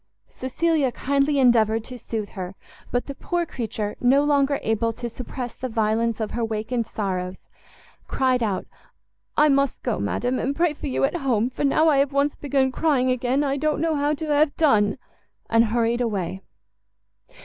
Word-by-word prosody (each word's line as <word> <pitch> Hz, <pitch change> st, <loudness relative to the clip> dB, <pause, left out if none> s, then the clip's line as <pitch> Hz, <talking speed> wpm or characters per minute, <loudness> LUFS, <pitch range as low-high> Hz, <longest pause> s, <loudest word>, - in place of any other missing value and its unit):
Cecilia 290 Hz, +1 st, 0 dB
kindly 280 Hz, +3 st, +1 dB
endeavoured 225 Hz, -4 st, +4 dB
to 255 Hz, -, -9 dB
soothe 220 Hz, -3 st, -4 dB
her, 185 Hz, -1 st, -6 dB, 0.3 s
but 245 Hz, -, -1 dB
the 280 Hz, -, -6 dB
poor 345 Hz, +4 st, -2 dB
creature, 220 Hz, -7 st, -4 dB
no 270 Hz, +3 st, +4 dB
longer 285 Hz, -1 st, +2 dB
able 225 Hz, +1 st, +1 dB
to 240 Hz, +2 st, -5 dB
suppress 245 Hz, +1 st, -6 dB
the 255 Hz, -, -5 dB
violence 225 Hz, +1 st, 0 dB
of 220 Hz, -2 st, -3 dB
her 235 Hz, -, -3 dB
awakened 225 Hz, +1 st, -2 dB
sorrows, 185 Hz, -3 st, -3 dB, 0.7 s
cried 255 Hz, -2 st, +1 dB
out, 205 Hz, -5 st, -1 dB, 0.7 s
"I 300 Hz, -, +6 dB
must 275 Hz, -2 st, +1 dB
go, -, -, -1 dB
madam, 245 Hz, -, -1 dB
and 280 Hz, +2 st, -1 dB
pray 335 Hz, -1 st, +2 dB
for 295 Hz, -, -6 dB
you 270 Hz, -, -1 dB
at 275 Hz, +6 st, +1 dB
home, 250 Hz, -5 st, 0 dB
for -, -, -4 dB
now 300 Hz, +3 st, +3 dB
I 300 Hz, -3 st, +4 dB
have 280 Hz, 0 st, +1 dB
once 280 Hz, +1 st, +1 dB
begun 270 Hz, -2 st, 0 dB
crying 260 Hz, -3 st, +2 dB
again, 255 Hz, +3 st, +1 dB
I 280 Hz, -1 st, 0 dB
don't 305 Hz, +1 st, 0 dB
know 325 Hz, 0 st, +1 dB
how 290 Hz, 0 st, +1 dB
to 315 Hz, -, -5 dB
have 295 Hz, 0 st, +2 dB
done!" 210 Hz, -10 st, +3 dB, 0.5 s
and 230 Hz, 0 st, +5 dB
hurried 235 Hz, +2 st, +1 dB
away. 195 Hz, -5 st, -2 dB
255 Hz, 175 wpm, -24 LUFS, 225-280 Hz, 0.7 s, I